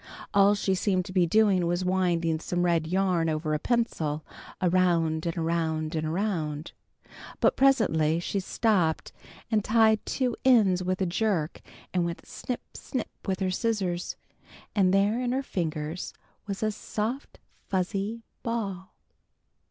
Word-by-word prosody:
All 200 +1 +5
she 200 -1 0
seemed 185 -1 +1
to 185 - -8
be 180 -2 +3
doing 195 -2 +3
was 175 +2 0
winding 175 -3 +1
some 175 +2 -1
red 165 -2 +2
yarn 180 -2 +1
over 155 0 -1
a 150 - 0
pencil, 160 -10 -1 0.3
around 170 -3 +2
and 165 - -2
around 160 -1 -1
and 155 -1 -1
around. 160 -4 -2 0.7
But - - +3
presently 170 - +3
she 195 +3 -2
stopped 185 -5 +1 0.4
and 215 -2 +2
tied 220 0 +4
two 250 -3 -1
ends 210 -8 +5
with 185 +1 -1
a - - +3
jerk, 180 -3 -1 0.3
and 180 -1 +2
went 170 0 -4
snip, 250 - -5
snip 255 -4 -4 0.2
with 190 0 -1
her 185 -1 +1
scissors, 185 -4 -1 0.6
and 190 -3 +4
there 200 +5 +2
in 250 0 0
her 270 +1 0
fingers 160 - -3 0.3
was 200 +1 -3
a 215 - +2
soft 220 +5 -4 0.3
fuzzy 195 +4 -1 0.2
ball. 205 -6 -4
185 Hz, 145 wpm, -27 LUFS, 165-215 Hz, 0.7 s, All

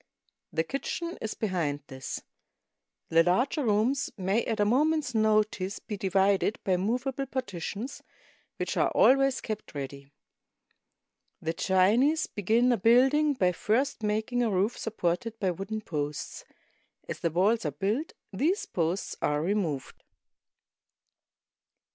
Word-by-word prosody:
The 160 - 0
kitchen 335 - -4
is 220 - -3
behind 170 -9 -1
this. 130 -1 -6 0.9
The 165 0 +5
larger 245 - +1
rooms 230 +4 +1
may 195 +4 +1
at 225 -2 -2
a 205 - +4
moment's 290 +4 +2
notice 215 -3 +1
be 210 - -6
divided 195 +1 +2
by 190 - +1
mov 230 +8 -1
able 270 0 -2
partitions, 235 -1 -5 0.6
which - - -3
are - - +3
always 270 0 +4
kept 215 -7 -6
ready. 140 0 -7 1.3
The 165 - -2
Chinese 220 - +3
begin 225 +5 +2
a 240 - +3
building 265 +8 +4
by 180 -7 +2
first 240 +7 0
making 220 +3 0
a 235 - +2
roof 200 +4 +1
supported 220 +1 -2
by 190 -3 +1
wooden 195 +5 -4
posts. 150 -6 -4 0.6
As - - -5
the 170 - 0
walls 200 +8 +2
are 155 - 0
built, 205 - -2 0.2
these 320 - +1
posts 170 +2 -2
are 150 0 +1
removed. 170 -8 -2
210 Hz, 130 wpm, -28 LUFS, 180-250 Hz, 1.3 s, The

